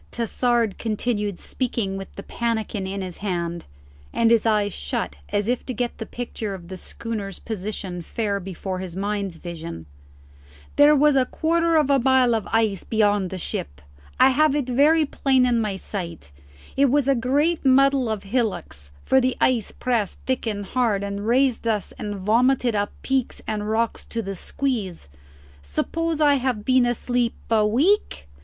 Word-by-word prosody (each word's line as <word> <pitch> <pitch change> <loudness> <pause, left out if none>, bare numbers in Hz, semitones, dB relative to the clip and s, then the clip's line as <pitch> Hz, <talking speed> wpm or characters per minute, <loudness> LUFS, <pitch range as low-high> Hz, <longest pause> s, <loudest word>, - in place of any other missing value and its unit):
Tassard 235 -2 0
continued 210 -3 -1
speaking 230 -6 -2
with 195 0 -7
the 200 - -7
pannikin 220 -4 -2
in 195 0 -4
his 180 -2 -7
hand, 170 -4 -3 0.5
and 230 0 +2
his 230 -1 +4
eyes 210 -2 +2
shut 70 +1 -3
as 205 0 0
if 245 +1 0
to 255 - -3
get 240 +1 -3
the 225 - -5
picture 225 -4 -5
of 175 -2 -12
the 190 - -6
schooner's 200 0 -6
position 195 -4 -5
fair 200 +3 -2
before 185 0 -5
his 185 -2 -6
mind's 200 -2 -2
vision: 165 - -7 0.9
"There 295 +1 +7
was 295 0 +4
a 260 -2 +3
quarter 335 +1 +1
of 300 -3 +3
a 275 - +4
mile 260 -1 +4
of 220 -3 -1
ice 220 -4 +1
beyond 205 -4 +1
the 190 - -5
ship: 70 - -4 0.4
I - - +7
have 300 +2 +3
it 285 -4 -1
very 300 +5 +4
plain 265 -2 +2
in 240 -2 +2
my 210 -3 -1
sight: 170 - -6 0.4
it 275 - +4
was 280 +1 +2
a 275 - +5
great 285 +7 +1
muddle 270 -2 +4
of 215 -2 -3
hillocks, 200 - -2 0.2
for 265 - +4
the 255 0 0
ice 240 -5 +2
pressed 235 -6 -1
thick 260 -2 -1
and 205 -2 -3
hard, 220 -3 0
and 200 +1 -4
raised 250 -1 +2
us 210 -4 0
and 205 -1 -4
vomited 240 +5 +2
up 205 0 0
peaks 265 -2 -1
and 210 -1 -3
rocks 225 +1 0
to 230 -1 -4
the 195 0 -4
squeeze. 210 - -3 0.5
Suppose 320 - -2
I 290 -2 +5
have 245 -5 -1
been 255 -1 +4
asleep 240 0 0 0.2
a 215 -2 +4
week?" 280 - +1
225 Hz, 170 wpm, -23 LUFS, 195-255 Hz, 0.9 s, There